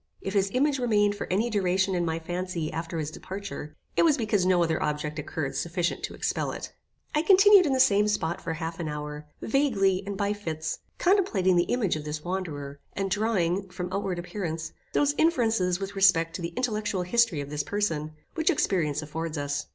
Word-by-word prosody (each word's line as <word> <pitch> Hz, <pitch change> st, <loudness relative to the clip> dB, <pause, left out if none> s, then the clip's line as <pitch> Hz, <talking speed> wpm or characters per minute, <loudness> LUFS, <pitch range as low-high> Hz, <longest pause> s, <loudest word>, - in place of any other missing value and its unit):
If 195 Hz, -, -4 dB
his 200 Hz, -1 st, +2 dB
image 280 Hz, +1 st, +2 dB
remained 210 Hz, -4 st, +3 dB
for 205 Hz, -, -5 dB
any 220 Hz, +6 st, +1 dB
duration 190 Hz, -1 st, +1 dB
in 175 Hz, -1 st, +1 dB
my 160 Hz, -1 st, -1 dB
fancy 175 Hz, -1 st, -3 dB
after 165 Hz, +1 st, -4 dB
his 155 Hz, -1 st, -3 dB
departure, 190 Hz, -4 st, -7 dB, 0.2 s
it -, -, +4 dB
was 315 Hz, -3 st, +4 dB
because 210 Hz, -6 st, +1 dB
no 180 Hz, -2 st, +4 dB
other 160 Hz, -1 st, 0 dB
object 150 Hz, 0 st, -2 dB
occurred 150 Hz, -1 st, -3 dB
sufficient 175 Hz, +1 st, -1 dB
to -, -, -9 dB
expel -, -, -1 dB
it. -, -, -6 dB, 0.4 s
I 300 Hz, -, +3 dB
continued 390 Hz, 0 st, +7 dB
in 275 Hz, -, +1 dB
the 260 Hz, -, +1 dB
same 210 Hz, -4 st, +5 dB
spot 175 Hz, -5 st, -1 dB
for 165 Hz, -, -3 dB
half 165 Hz, +1 st, -5 dB
an 165 Hz, -, -3 dB
hour, 150 Hz, 0 st, -5 dB, 0.2 s
vaguely, 205 Hz, -8 st, +2 dB
and 200 Hz, -1 st, -3 dB
by 205 Hz, +1 st, 0 dB
fits, 160 Hz, -6 st, -4 dB, 0.2 s
contemplating 245 Hz, -, +3 dB
the 175 Hz, 0 st, +3 dB
image 220 Hz, -9 st, +1 dB
of 155 Hz, -, -5 dB
this 150 Hz, 0 st, -5 dB
wanderer, 150 Hz, -6 st, -4 dB
and 195 Hz, -1 st, -2 dB
drawing, 195 Hz, -3 st, 0 dB
from 180 Hz, 0 st, -5 dB
outward 195 Hz, -2 st, -1 dB
appearances, 165 Hz, -3 st, -4 dB, 0.2 s
those 290 Hz, 0 st, +3 dB
inferences 225 Hz, -, +2 dB
with 195 Hz, 0 st, -5 dB
respect 185 Hz, -4 st, +4 dB
to -, -, -4 dB
the 170 Hz, 0 st, -5 dB
intellectual 210 Hz, -6 st, -1 dB
history 230 Hz, -3 st, +2 dB
of 140 Hz, 0 st, -5 dB
this 150 Hz, 0 st, -1 dB
person, 155 Hz, -5 st, -2 dB, 0.2 s
which 320 Hz, -1 st, +1 dB
experience 155 Hz, -, +1 dB
affords 160 Hz, +1 st, -4 dB
us. 145 Hz, 0 st, -2 dB
185 Hz, 195 wpm, -27 LUFS, 160-210 Hz, 0.4 s, continued